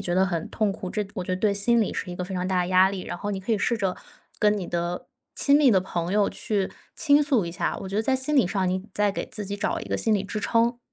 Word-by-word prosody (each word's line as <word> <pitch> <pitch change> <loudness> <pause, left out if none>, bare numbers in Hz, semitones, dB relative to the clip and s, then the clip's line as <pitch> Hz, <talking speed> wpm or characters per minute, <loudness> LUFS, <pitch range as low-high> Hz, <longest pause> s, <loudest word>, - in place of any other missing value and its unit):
觉 175 - -1
得 190 +1 +4
很 170 -3 -2
痛 215 -2 +1
苦， 195 -1 -5
这 210 -1 -1
我 185 -4 -3
觉 185 - -2
得 - - -3
对 210 -2 +3
心 230 +4 +2
理 210 - 0
是 180 - -4
一 - - -5
个 180 - -3
非 185 +2 -6
常 180 0 -1
大 185 -1 +1
的 175 - -3
压 185 +1 +5
力， 195 - -4
然 - - -5
后 205 - -3
你 190 - -3
可 195 - -5
以 220 - +2
试 235 - +1
着 195 -4 -1 0.4
跟 210 0 +3
你 185 - -4
的 175 +1 -3 0.3
亲 280 0 +4
密 285 -4 +5
的 190 -3 +4
朋 175 -1 -3
友 205 -1 +3
去 200 -3 -1 0.2
倾 290 -1 +4
诉 270 - +2
一 170 - -4
下， 170 +1 -2
我 190 - -6
觉 195 - -3
得 220 - +2
在 265 - +1
心 270 +3 0
理 245 - +5
上 190 -1 0
你 185 +1 -2
再 205 -1 +2
给 - - -4
自 210 - -5
己 200 +1 -4
找 - - -1
一 - - -6
个 - - -2
心 220 - +2
理 200 - 0
支 205 +2 -4
撑。 230 +3 +1
200 Hz, 330 characters per minute, -25 LUFS, 185-220 Hz, 0.4 s, 压